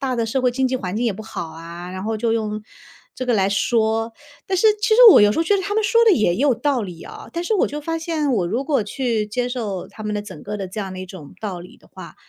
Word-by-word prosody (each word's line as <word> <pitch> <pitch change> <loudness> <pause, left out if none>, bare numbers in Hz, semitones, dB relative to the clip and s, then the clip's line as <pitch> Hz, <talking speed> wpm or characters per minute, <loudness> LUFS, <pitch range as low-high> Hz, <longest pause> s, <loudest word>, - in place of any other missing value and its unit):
大 260 -3 -1
的 230 - 0
社 255 +3 -1
会 250 - +3
经 260 +2 0
济 260 - -2
环 195 -4 -4
境 240 - -1
也 220 - +1
不 220 +3 -8
好 175 -6 -6
啊， 170 +2 -9
然 185 0 -6
后 220 0 -1
就 225 +1 0
用 215 -1 -2 0.5
这 255 - -5
个 245 - +2
来 195 -1 +2
说， 225 +2 +1 0.3
但 380 - 0
是 435 +4 +5
其 - - +1
实 470 - +5
我 - - +8
有 205 0 +5
时 - - -3
候 330 - +3
觉 400 +5 +2
得 - - -1
他 405 +2 -3
们 440 - +2
说 465 +1 +4
得 440 - +6
也 180 - +2
有 270 0 +3
道 280 -2 0
理 180 -4 -8
啊， - - -10
但 340 - -3
是 440 - -1
我 385 - +3
就 295 +1 -5
发 330 +2 -3
现 320 -4 -1
我 190 -7 +1
如 230 +9 -1
果 275 -8 +1
去 230 -2 -1
接 245 +4 -2
受 215 -7 -4
他 215 - -10
们 210 - -2
的 205 - -2
整 210 - -10
个 210 +1 -4
的 195 -2 -5
这 215 - -8
样 190 -2 -5
的 185 - -7
一 185 - -7
种 170 -6 -11
道 200 -5 -4
理 180 - -13
的 - - -23
话， - - -11
225 Hz, 320 characters per minute, -21 LUFS, 200-275 Hz, 0.5 s, 我